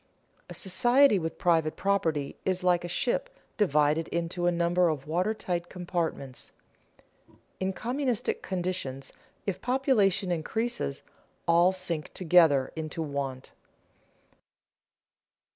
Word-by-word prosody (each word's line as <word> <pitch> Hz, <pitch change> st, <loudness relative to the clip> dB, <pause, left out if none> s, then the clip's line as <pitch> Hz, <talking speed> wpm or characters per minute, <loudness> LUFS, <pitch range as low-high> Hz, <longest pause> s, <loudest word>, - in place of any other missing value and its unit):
A -, -, -8 dB
society 240 Hz, +4 st, +4 dB
with 165 Hz, -1 st, -4 dB
private 165 Hz, -3 st, +2 dB
property 165 Hz, -8 st, 0 dB
is 185 Hz, -1 st, -1 dB
like 180 Hz, -1 st, +3 dB
a -, -, -4 dB
ship 255 Hz, -, -1 dB, 0.3 s
divided 155 Hz, -4 st, +2 dB
into 170 Hz, +1 st, -2 dB
a -, -, +4 dB
number 175 Hz, +1 st, +2 dB
of 150 Hz, -4 st, -3 dB
water 180 Hz, +8 st, 0 dB
tight 175 Hz, -4 st, -3 dB
compartments. 170 Hz, -7 st, -4 dB, 1.1 s
In 190 Hz, 0 st, 0 dB
communistic 245 Hz, +2 st, -2 dB
conditions 175 Hz, -8 st, -4 dB, 0.3 s
if 195 Hz, -3 st, -3 dB
population 215 Hz, -8 st, +2 dB
increases, 175 Hz, -, -2 dB, 0.4 s
all 170 Hz, +2 st, +5 dB
sink 180 Hz, -5 st, -3 dB
together 160 Hz, -7 st, +4 dB
into 160 Hz, 0 st, -4 dB
want. 140 Hz, -3 st, -4 dB
175 Hz, 110 wpm, -28 LUFS, 160-195 Hz, 1.1 s, all